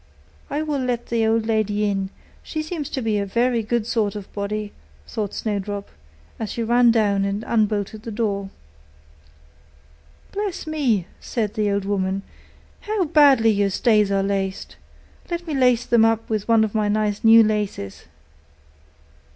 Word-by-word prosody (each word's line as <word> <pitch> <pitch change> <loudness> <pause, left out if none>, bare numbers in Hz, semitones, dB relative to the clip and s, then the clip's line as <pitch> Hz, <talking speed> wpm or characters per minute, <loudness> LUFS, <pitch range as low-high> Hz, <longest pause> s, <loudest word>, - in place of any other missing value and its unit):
'I 300 +2 -1
will 300 -2 -2
let 245 -2 -2
the 230 -1 +1
old 225 0 +1
lady 210 -2 +1
in; 195 -1 -1 0.3
she 310 -1 -4
seems 310 -3 -5
to 260 - -3
be 215 -2 +1
a - - 0
very 235 +3 +1
good 230 0 -1
sort 215 -3 0
of 205 -2 -8
body,' 205 +1 -3 0.3
thought 210 -3 -4
Snowdrop, 205 -1 -3 0.5
as 220 - -4
she 235 - -3
ran 240 +1 +4
down 205 -4 +2
and 200 +2 -2
unbolted 210 -1 0
the 230 - -7
door. 205 -3 -2 1.8
'Bless 405 -2 -3
me!' 270 - 0
said 215 -4 -3
the 215 -2 0
old 200 -1 -1
woman, 195 -1 -1 0.6
'how 420 -2 -1
badly 280 -8 +5
your 200 -1 +1
stays 210 0 +2
are 195 0 +2
laced! 195 -1 -3 0.5
Let 345 0 -3
me 320 - -4
lace 250 -3 +3
them 235 -2 +4
up 225 0 +2
with 215 -2 -1
one 225 -1 +5
of 215 - -2
my 215 -1 +1
nice 210 -1 0
new 225 0 +8
laces. 210 - -3
220 Hz, 160 wpm, -22 LUFS, 205-240 Hz, 1.8 s, new